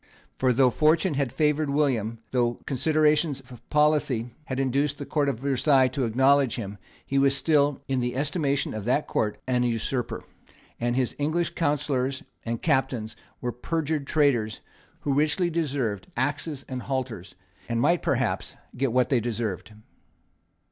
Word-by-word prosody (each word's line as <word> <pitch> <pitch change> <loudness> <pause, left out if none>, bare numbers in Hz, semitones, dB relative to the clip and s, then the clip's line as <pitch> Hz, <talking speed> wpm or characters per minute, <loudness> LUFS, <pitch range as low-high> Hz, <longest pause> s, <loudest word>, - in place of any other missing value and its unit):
For, 130 -1 +3
though 125 +1 +4
fortune 155 +5 +3
had 140 -3 0
favoured 150 -1 +1
William, 130 -6 +1
though 120 -2 +1
considerations 150 +1 +2
of 125 - -11
policy 150 -6 +2
had 130 -1 -3
induced 140 +2 +1
the 140 - -6
Court 145 -1 +1
of 115 - -3
Versailles 135 -1 +3
to 135 -2 -1
acknowledge 135 +2 +3
him, 105 -4 -6 0.3
he 140 - +1
was 140 0 +3
still, 145 -2 +2
in 135 -1 0
the 125 0 -2
estimation 145 0 0
of 110 -1 -4
that 135 +5 +2
Court, 105 -1 -1
an 125 -1 +1
usurper; 120 +1 -1 0.6
and 120 0 0
his 130 -2 0
English 155 +4 0
councillors 140 -4 -1 0.2
and 115 0 -4
captains 130 -7 0 0.3
were 125 - -1
perjured 150 +2 -2
traitors 125 -8 +2 0.4
who 140 - 0
richly 155 +5 +2
deserved 135 - -1
axes 145 +2 -2
and 130 -1 -4
halters, 125 -9 -4 0.3
and 115 0 0
might, 170 +8 +3
perhaps, - - -1 0.2
get 130 0 0
what 125 +1 +2
they 130 - +3
deserved. 115 -4 -3
135 Hz, 150 wpm, -26 LUFS, 120-150 Hz, 0.6 s, though